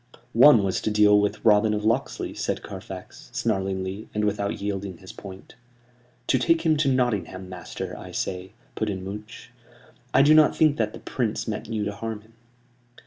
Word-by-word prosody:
"One 120 Hz, -2 st, +7 dB
was 95 Hz, -1 st, -1 dB
to -, -, -1 dB
deal 105 Hz, -1 st, +5 dB
with 105 Hz, 0 st, -1 dB
Robin 105 Hz, 0 st, +5 dB
of 105 Hz, 0 st, -3 dB
Locksley," 115 Hz, +5 st, -1 dB
said -, -, -3 dB
Carfax, -, -, -9 dB
snarlingly, 95 Hz, -1 st, -2 dB
and 105 Hz, 0 st, +1 dB
without 100 Hz, -1 st, -1 dB
yielding 100 Hz, -2 st, -4 dB
his 95 Hz, +1 st, -12 dB
point. 95 Hz, -1 st, -11 dB, 0.7 s
"To 130 Hz, -, +2 dB
take 165 Hz, +6 st, +2 dB
him 160 Hz, -1 st, +4 dB
to 145 Hz, -2 st, +2 dB
Nottingham, 105 Hz, -8 st, -1 dB
master, 90 Hz, -3 st, -7 dB
I -, -, -9 dB
say," 95 Hz, +1 st, -4 dB, 0.2 s
put 110 Hz, -, -2 dB
in 95 Hz, -2 st, -4 dB
Much. 105 Hz, +3 st, -9 dB, 0.6 s
"I 135 Hz, -, +5 dB
do 150 Hz, +2 st, +6 dB
not 155 Hz, -1 st, +6 dB
think 155 Hz, -2 st, +3 dB
that 110 Hz, -2 st, -1 dB
the -, -, -9 dB
Prince 115 Hz, -3 st, -2 dB
meant 105 Hz, -2 st, -4 dB
you 105 Hz, -2 st, -1 dB
to 105 Hz, -, -3 dB
harm 110 Hz, 0 st, -5 dB
him." 110 Hz, +2 st, -23 dB
105 Hz, 180 wpm, -25 LUFS, 95-115 Hz, 0.7 s, One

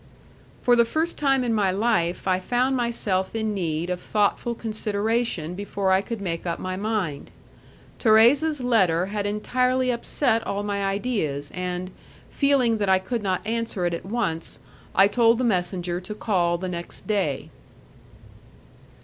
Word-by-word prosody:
For 245 Hz, -, +5 dB
the 235 Hz, -, +5 dB
first 315 Hz, +8 st, -1 dB
time 270 Hz, -3 st, +2 dB
in 235 Hz, -2 st, 0 dB
my 205 Hz, -3 st, +2 dB
life 190 Hz, -4 st, 0 dB
I 185 Hz, -1 st, +2 dB
found 250 Hz, +7 st, +1 dB
myself 225 Hz, -6 st, -1 dB
in 220 Hz, -1 st, -1 dB
need 170 Hz, -2 st, -2 dB
of 180 Hz, 0 st, -3 dB
thoughtful 215 Hz, +3 st, 0 dB
consideration 215 Hz, -5 st, -1 dB
before 200 Hz, 0 st, -2 dB
I 190 Hz, 0 st, +4 dB
could 225 Hz, +2 st, -5 dB
make 170 Hz, -4 st, -3 dB
up 170 Hz, -, -1 dB
my 185 Hz, 0 st, -4 dB
mind. 200 Hz, -8 st, -2 dB, 0.7 s
Thérèse's 260 Hz, +7 st, +4 dB
letter 190 Hz, -9 st, +3 dB
had 205 Hz, -1 st, -1 dB
entirely 250 Hz, +4 st, +1 dB
upset 235 Hz, 0 st, 0 dB
all 200 Hz, +1 st, -2 dB
my 200 Hz, -1 st, -2 dB
ideas, 195 Hz, -, -2 dB
and, 180 Hz, 0 st, -4 dB, 0.4 s
feeling 260 Hz, -6 st, +2 dB
that 205 Hz, -2 st, 0 dB
I 190 Hz, -, +6 dB
could 225 Hz, +5 st, -3 dB
not 190 Hz, -2 st, -1 dB
answer 225 Hz, -4 st, -2 dB
it 175 Hz, -, 0 dB
at 170 Hz, -, -4 dB
once, 190 Hz, -6 st, -2 dB, 0.4 s
I 195 Hz, +1 st, +7 dB
told 230 Hz, +2 st, +3 dB
the 255 Hz, -, -1 dB
messenger 180 Hz, -4 st, -1 dB
to 210 Hz, +3 st, -7 dB
call 175 Hz, -6 st, +1 dB
the 185 Hz, +2 st, -4 dB
next 170 Hz, -1 st, -6 dB
day. 195 Hz, -10 st, -1 dB
205 Hz, 155 wpm, -24 LUFS, 185-235 Hz, 0.7 s, I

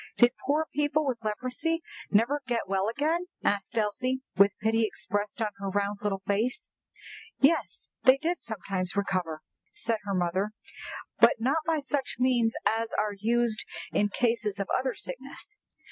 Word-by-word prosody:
"Did 240 Hz, 0 st, +7 dB, 0.2 s
poor 300 Hz, +3 st, +3 dB
people 295 Hz, +1 st, +1 dB
with 245 Hz, -4 st, -2 dB
leprosy 255 Hz, +10 st, -1 dB, 0.3 s
never 235 Hz, +8 st, +3 dB
get 235 Hz, -4 st, -1 dB
well 195 Hz, +2 st, +1 dB
again?" 315 Hz, +8 st, 0 dB, 0.2 s
asked 200 Hz, +3 st, 0 dB
Elsie, 255 Hz, +5 st, 0 dB
with 200 Hz, +1 st, +5 dB
pity 225 Hz, +1 st, +2 dB
expressed 210 Hz, 0 st, -2 dB
on 215 Hz, -, 0 dB
her 200 Hz, 0 st, -3 dB
round 200 Hz, +1 st, -1 dB
little 195 Hz, -2 st, -1 dB
face. 230 Hz, -, -1 dB, 0.7 s
"Yes, 305 Hz, +5 st, +2 dB
they 260 Hz, 0 st, +7 dB
did 335 Hz, +5 st, -1 dB
sometimes 195 Hz, -4 st, -2 dB
recover," 180 Hz, -6 st, -1 dB, 0.3 s
said 225 Hz, -1 st, 0 dB
her 200 Hz, -1 st, -1 dB
mother, 185 Hz, +4 st, 0 dB, 0.7 s
"but -, -, +7 dB
not 270 Hz, +7 st, +2 dB
by 320 Hz, -2 st, +2 dB
such 280 Hz, 0 st, -2 dB
means 245 Hz, -2 st, +3 dB
as 225 Hz, 0 st, +1 dB
are 210 Hz, 0 st, +1 dB
used 230 Hz, +2 st, +1 dB, 0.3 s
in 205 Hz, -, +2 dB
cases 220 Hz, -3 st, 0 dB
of 200 Hz, -, -2 dB
other 260 Hz, -1 st, 0 dB
sickness. 270 Hz, -, -6 dB
225 Hz, 150 wpm, -29 LUFS, 205-265 Hz, 0.7 s, Did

